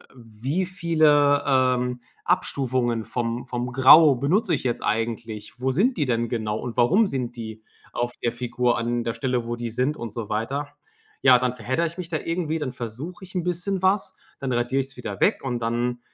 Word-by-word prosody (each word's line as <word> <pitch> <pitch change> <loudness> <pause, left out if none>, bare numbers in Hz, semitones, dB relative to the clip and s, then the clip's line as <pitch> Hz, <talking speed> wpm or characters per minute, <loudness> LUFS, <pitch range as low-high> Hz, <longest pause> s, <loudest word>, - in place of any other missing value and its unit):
wie 125 - -3
viele, 155 -6 +3
ähm, 125 -2 +2 0.3
Abstufungen 125 -9 0
vom 120 0 -3
vom 125 -1 -3
Grau 135 +3 +8
benutze 170 - +1
ich - - -5
jetzt 120 -2 -2
eigentlich? 110 -2 -3
Wo 130 - +1
sind 220 - +2
die 150 - +1
denn 120 -1 0
genau 110 -3 -2
und 120 -2 -5
warum 185 - +4
sind 125 -6 -3
die 110 -1 -7 0.3
auf 120 0 -2
der 120 - +2
Figur 120 0 0
an 120 0 -1
der 115 - -2
Stelle, 125 0 -1
wo 120 0 -3
die 120 0 -4
sind, 130 +6 0
und 115 -2 -6
so 115 -2 -5
weiter. 130 +7 -2 0.5
Ja, 130 -2 +7
dann 125 0 0
verheddere 130 +8 -1
ich 170 - -10
mich 170 - -5
da 160 - -1
irgendwie. 165 -1 -2
Dann 135 -4 -3
versuche 130 - -7
ich 190 - -17
'n 180 - 0
bisschen 180 +2 -2
was. 190 +2 +1 0.2
Dann 135 -1 -3
radiere 120 +3 0
ich's 135 0 -9
wieder 105 -5 -6
weg - - +3
und 125 -3 -2
dann, 120 +1 -1
125 Hz, 195 wpm, -24 LUFS, 120-150 Hz, 0.5 s, Grau